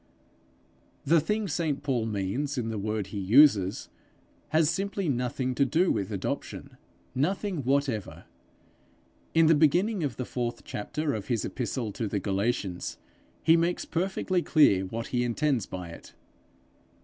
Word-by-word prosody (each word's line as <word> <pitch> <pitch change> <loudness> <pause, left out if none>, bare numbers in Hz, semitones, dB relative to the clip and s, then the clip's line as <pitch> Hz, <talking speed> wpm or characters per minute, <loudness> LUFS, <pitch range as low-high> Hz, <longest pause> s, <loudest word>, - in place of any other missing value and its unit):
The 165 +3 +5
thing 210 +6 -1
St 155 -4 -1
Paul 125 -6 0
means 110 +8 -2
in 115 -2 -1
the 110 -2 -3
word 105 -1 -2
he 100 - -3
uses, 100 -2 +4 0.6
has 155 0 +3
simply 195 +2 -1
nothing 125 0 -1
to 140 - +2
do 165 +8 +2
with 100 +2 -2
adoption 100 -3 -5 0.4
nothing 185 +7 -1
whatever. 135 -5 -1 1.1
In 165 0 +6
the 160 - +6
beginning 175 +6 +3
of 135 -6 -2
the 125 - -4
fourth 120 -1 -4
chapter 150 +8 -3
of 105 -3 -5
his 120 -4 0
epistle 120 -3 -3
to 110 +2 -3
the 100 0 -1
Galatians, 100 -1 -2 0.5
he 165 - +6
makes 170 +1 0
perfectly 185 +1 -1
clear 100 - +4
what 115 +4 -5
he 125 -1 0
intends 125 -1 0
by 90 -2 -6
it. 85 - -12
130 Hz, 145 wpm, -28 LUFS, 110-160 Hz, 1.1 s, In